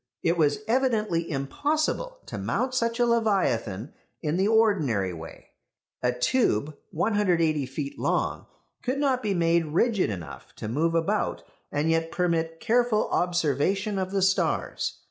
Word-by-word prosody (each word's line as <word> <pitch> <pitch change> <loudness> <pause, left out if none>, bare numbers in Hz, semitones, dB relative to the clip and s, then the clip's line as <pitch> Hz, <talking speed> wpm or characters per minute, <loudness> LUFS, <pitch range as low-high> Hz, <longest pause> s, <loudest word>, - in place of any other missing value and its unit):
It 170 +1 +2
was 150 +1 +2
evidently 220 -9 +1
impossible 305 - -1
to - - -6
mount 255 0 -1
such 230 -1 0
a 240 - +4
leviathan 165 - 0 0.3
in 155 0 0
the 190 +3 +2
ordinary 160 - +2
way. 80 0 -10 0.5
A 125 - +2
tube, 145 - +1
180 170 - +1
feet 140 +1 -5
long, - - -1 0.3
could 255 +2 -1
not 270 -3 +1
be 205 -4 -1
made 170 -1 +2
rigid 190 - +2
enough 80 -10 -8
to - - -6
move 160 +9 0
about 180 +6 0 0.3
and 150 +3 +1
yet 165 0 0
permit 165 -2 0
careful 235 -2 +2
observation 175 +4 0
of 185 -1 -2
the 195 -1 0
stars. 190 0 0
175 Hz, 140 wpm, -26 LUFS, 150-220 Hz, 0.5 s, a